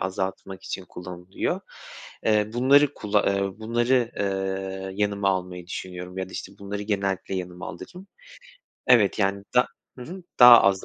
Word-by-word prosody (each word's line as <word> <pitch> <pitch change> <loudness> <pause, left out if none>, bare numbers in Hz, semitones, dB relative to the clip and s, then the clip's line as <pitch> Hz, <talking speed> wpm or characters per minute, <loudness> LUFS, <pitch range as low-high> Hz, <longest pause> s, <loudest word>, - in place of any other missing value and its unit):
azaltmak 95 0 -4
için 95 - -5
kullanılıyor. 90 +1 -4 0.6
Eee, 105 -1 +2
bunları 140 +4 +4
kulla 105 -1 +1
ııı, 100 0 0
bunları, 120 +2 +1
eee, 95 -1 -3
yanıma 100 -1 0
almayı 90 -2 -3
düşünüyorum 90 0 -7
ya 95 - -3
da - - -14
işte - - -7
bunları 100 +1 -5
genellikle 100 -2 -2
yanıma 90 0 -5
alırım. 180 +2 -10 0.8
Evet, 115 -6 +5
yani, 100 0 0
da 125 - +5 0.3
hı - - -7
hı, 180 +8 -9 0.2
daha 120 -1 +11
az 95 -1 +2
100 Hz, 145 wpm, -25 LUFS, 95-110 Hz, 0.8 s, daha